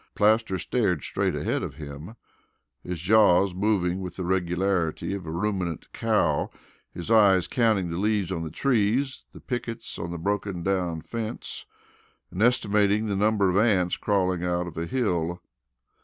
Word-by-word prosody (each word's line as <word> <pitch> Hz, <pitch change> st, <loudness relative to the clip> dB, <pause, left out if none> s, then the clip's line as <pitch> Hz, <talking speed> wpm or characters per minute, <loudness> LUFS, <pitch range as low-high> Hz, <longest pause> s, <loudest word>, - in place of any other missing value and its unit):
Plaster 110 Hz, -2 st, +3 dB
stared 95 Hz, -, 0 dB
straight -, -, -1 dB
ahead -, -, -1 dB
of -, -, -5 dB
him, 75 Hz, +6 st, -9 dB, 0.7 s
his 90 Hz, -2 st, -5 dB
jaws 95 Hz, 0 st, +4 dB
moving 95 Hz, -2 st, 0 dB
with 90 Hz, -2 st, -6 dB
the 95 Hz, -, -4 dB
regularity 90 Hz, -1 st, 0 dB
of 95 Hz, -4 st, -6 dB
a -, -, -4 dB
ruminant 90 Hz, -2 st, -3 dB
cow, 95 Hz, -10 st, +1 dB, 0.4 s
his 90 Hz, +5 st, -6 dB
eyes 100 Hz, -5 st, +5 dB
counting 110 Hz, -8 st, +1 dB
the 85 Hz, -, -3 dB
leaves 105 Hz, -2 st, 0 dB
on 85 Hz, -3 st, -2 dB
the 80 Hz, -, -4 dB
trees, 130 Hz, -, 0 dB
the -, -, -12 dB
pickets 115 Hz, -2 st, -5 dB
on 85 Hz, -, -4 dB
the 85 Hz, -, -4 dB
broken 100 Hz, 0 st, -2 dB
down 90 Hz, -4 st, -1 dB
fence, 115 Hz, 0 st, -6 dB, 0.6 s
and 95 Hz, -, -4 dB
estimating 105 Hz, -3 st, +3 dB
the 100 Hz, -2 st, -1 dB
number 105 Hz, 0 st, +2 dB
of 90 Hz, -, +1 dB
ants 100 Hz, -5 st, +3 dB
crawling 95 Hz, -4 st, 0 dB
out 90 Hz, 0 st, 0 dB
of 85 Hz, -, -8 dB
a 85 Hz, +1 st, -3 dB
hill. 90 Hz, -7 st, -1 dB
95 Hz, 155 wpm, -26 LUFS, 85-110 Hz, 0.7 s, eyes